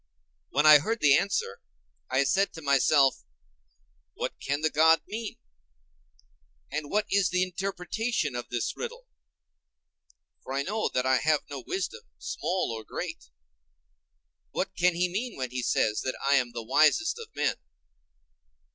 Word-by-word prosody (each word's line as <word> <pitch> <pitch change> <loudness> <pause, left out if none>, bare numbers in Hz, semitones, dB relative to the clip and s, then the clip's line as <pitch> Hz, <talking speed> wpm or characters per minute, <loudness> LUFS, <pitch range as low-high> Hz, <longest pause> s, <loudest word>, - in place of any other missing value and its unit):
When 145 +3 +1
I 150 -1 +10
heard 225 +9 -2
the 145 -2 +6
answer, 195 - -1 0.5
I 130 +2 +2
said 195 +9 +1
to 160 - -9
myself, 140 0 +3 0.9
What - - -3
can 140 +2 -2
the 155 -1 +1
god 160 +2 +5
mean? 220 0 -5 1.3
and 150 0 -3
what 210 +1 +1
is 200 -2 +3
the 180 +1 +2
interpretation 185 - -2
of 120 - -5
this 120 -2 -2
riddle? 480 +1 -7 1.4
for 130 - -6
I 140 +1 0
know 215 +7 -1
that 125 0 +1
I 130 0 +4
have 155 +1 +2
no 140 - -6
wisdom, 385 +5 -3 0.2
small 185 -8 -2
or 110 - -7
great. - - -6 1.2
What - - -3
can 180 0 +2
he 180 +1 +1
mean 220 +7 -4
when 130 -2 -4
he 130 0 -3
says 110 -3 +1
that 130 - -3
I 140 +1 +2
am 125 -3 +2
the 120 -1 -6
wisest 155 - +3
of 460 - -8
men? - - 0
155 Hz, 150 wpm, -28 LUFS, 135-200 Hz, 1.4 s, I